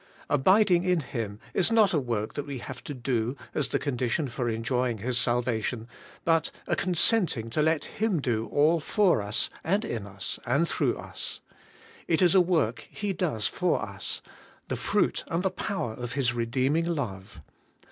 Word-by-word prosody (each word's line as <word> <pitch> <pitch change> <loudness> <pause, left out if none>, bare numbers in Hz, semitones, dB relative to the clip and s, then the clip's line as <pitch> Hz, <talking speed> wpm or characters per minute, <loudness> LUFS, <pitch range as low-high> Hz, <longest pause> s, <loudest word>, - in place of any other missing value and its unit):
Abiding 185 +3 +4
in 180 -3 +2
Him 115 -6 -4
is 190 +4 +3
not 220 -4 +5
a 155 - +3
work 115 -5 -2
that 145 - -4
we 140 -2 -4
have 125 +1 -8
to 145 - -4
do 120 0 -1 0.2
as 150 - +1
the - - 0
condition 135 +2 -1
for 120 -1 -2
enjoying 120 +1 0
His 120 +5 -2
salvation, 120 -2 0 0.4
but 165 -1 +3 0.2
a - - 0
consenting 175 - +2
to 150 - +1
let 160 0 +2
Him 215 -5 0
do 115 -4 -1
all 155 +3 +3
for 180 - +3
us, 100 +1 -1
and 200 +6 +1
in 110 -4 -4
us, 95 -1 -5
and 140 +8 +2
through - - 0
us. - - -6 0.7
It 165 +2 +3
is 175 - +5
a 190 - +7
work 165 -10 0
He 205 -2 -3
does 155 - -1
for - - +1
us, - - -5 0.2
— - - -28
the - - 0
fruit - - +1
and 170 +2 -1
the 190 - +1
power 155 - -3
of 120 +1 -6
His 130 -4 +1
redeeming 130 +7 +1
love. 110 - -4
135 Hz, 180 wpm, -28 LUFS, 115-170 Hz, 0.7 s, a